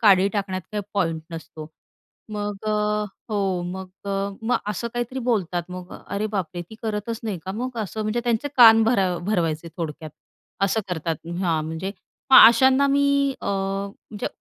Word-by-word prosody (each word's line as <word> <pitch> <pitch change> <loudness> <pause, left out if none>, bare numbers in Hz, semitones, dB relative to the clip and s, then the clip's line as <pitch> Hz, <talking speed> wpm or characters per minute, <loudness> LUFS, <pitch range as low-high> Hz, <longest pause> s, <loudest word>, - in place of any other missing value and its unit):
काडी 195 -4 +6
टाकण्यात 195 -3 -2
काही 210 -1 -2
पॉइंट 165 -5 0
नसतो. 160 -1 -8 0.7
मग 205 -1 -3
अ, 215 - +1 0.6
हो 195 -4 0
मग 190 0 -7 0.2
अ - - -1 0.3
मग 230 +2 +1
असं 210 +3 -2
काहीतरी 240 +2 -3
बोलतात 195 -8 0
मग 180 0 -8 0.2
अरे, 200 +2 -2
बापरे! 180 -5 -3
ती 220 - -10
करतच 220 +1 -3
नाही 210 -4 -2
का 190 - -3
मग 240 +4 -4
असं 220 0 -3
म्हणजे 215 +2 -1
त्यांचे 240 +2 0
कान 225 -2 +9
भर 225 0 +3 0.3
भरवायचे 170 -5 0
थोडक्यात, 155 -2 -5 0.5
असं 195 +3 +2
करतात 165 -2 -3
हां, 165 -4 +1
म्हणजे 160 +5 -4 0.4
मग - - +11
अशांना 265 +4 +5
मी 280 0 +3
अ, - - -7
म्हणजे 195 +1 -3
200 Hz, 160 wpm, -24 LUFS, 180-225 Hz, 0.7 s, मग